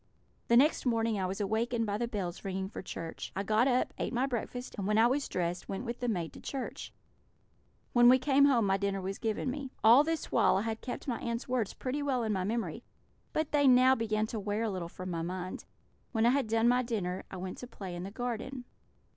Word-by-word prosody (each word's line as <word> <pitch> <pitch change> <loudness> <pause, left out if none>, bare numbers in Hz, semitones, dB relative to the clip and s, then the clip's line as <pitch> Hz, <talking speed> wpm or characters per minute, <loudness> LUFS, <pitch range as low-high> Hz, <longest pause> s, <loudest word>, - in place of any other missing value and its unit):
"The 235 - +5
next 295 +5 +4
morning 225 -3 +1
I 185 - 0
was 190 +3 -4
awakened 225 +3 0
by 205 0 -2
the 235 - 0
bells 190 -6 -4
ringing 190 0 -3
for - - -7
church. 165 -3 -6
I 195 - -1
got 220 +5 +3
up, 255 -1 +1
ate - - -2
my 250 +2 +2
breakfast, 245 0 -4
and 195 - -2
when 210 +1 +2
I 225 - +6
was 270 +4 +1
dressed 175 0 -2
went 195 +6 -4
with 235 0 -4
the 245 - -2
maid 175 -8 -2
to - - -11
church. 270 -2 -5 1.0
When 240 0 +7
we 255 - +8
came 275 +1 +4
home 245 -6 +4
my 195 0 +2
dinner 200 0 -1
was 195 +1 -4
given 225 +3 -1
me. 275 0 -5
All 235 +6 +8
this 325 +1 -2
while - - +4
I - - +1
had 225 0 -3
kept 250 - -6
my 240 -3 -1
aunts' 235 +1 -3
words 245 -5 -1
pretty 270 +3 -3
well 265 -4 0
in 215 -1 0
my 190 -2 -1
memory, 220 0 -2 0.5
but 310 -1 -1
they 285 -2 +4
now 255 +1 +7
began 215 -3 0
to 220 0 -4
wear 205 +2 -2
a 220 - 0
little 180 -3 -4
from 185 +1 -7
my 165 -1 -2
mind. 180 +2 -5 0.5
When 225 -1 +2
I 240 - +6
had 275 -3 +1
done 225 +1 +2
my 250 +1 +4
dinner 200 -7 -3
I 190 - -7
went 185 0 -6
to 250 - -7
play 195 -6 -7
in 175 - -5
the 190 - -5
garden. 245 +3 -4
225 Hz, 240 wpm, -31 LUFS, 195-250 Hz, 1.0 s, we